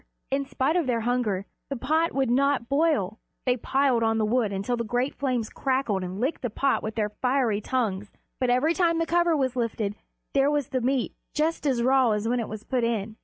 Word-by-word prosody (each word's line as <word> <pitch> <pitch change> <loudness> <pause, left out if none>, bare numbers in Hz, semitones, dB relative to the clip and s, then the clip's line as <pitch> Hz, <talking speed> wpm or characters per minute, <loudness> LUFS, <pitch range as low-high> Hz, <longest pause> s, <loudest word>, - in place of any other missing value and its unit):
In 275 0 0
spite 265 +4 0
of 345 -6 +1
their 235 -2 +1
hunger, 220 -5 0 0.2
the 275 - -2
pot 315 +6 +1
would 265 -3 0
not 275 -1 +2
boil. 275 - +1 0.3
They 250 -1 +3
piled 265 0 +1
on 225 0 +2
the 220 - +2
wood 225 -1 +1
until 200 +5 -1
the 235 - -2
great 245 +4 -1
flames 250 -5 -1
crackled 255 -8 -1
and 185 +2 -5
licked 265 +7 -1
the 245 - -2
pot 275 +5 +1
with 215 0 -5
their 210 -2 -1
fiery 250 -5 +1
tongues, 210 -5 -1 0.3
but 255 - +1
every 255 +7 +3
time 340 -2 +2
the 330 - +1
cover 340 -1 +2
was 260 -2 0
lifted 225 -4 -1 0.4
there 275 0 +4
was 290 -3 0
the 255 - -1
meat 255 0 0 0.2
just 310 0 0
as 250 -4 +1
raw 260 -1 +4
as 210 +1 -1
when 245 +1 +1
it 230 - -3
was 215 0 -7
put 250 -2 -1
in. 220 -2 -1
250 Hz, 220 wpm, -26 LUFS, 225-275 Hz, 0.4 s, there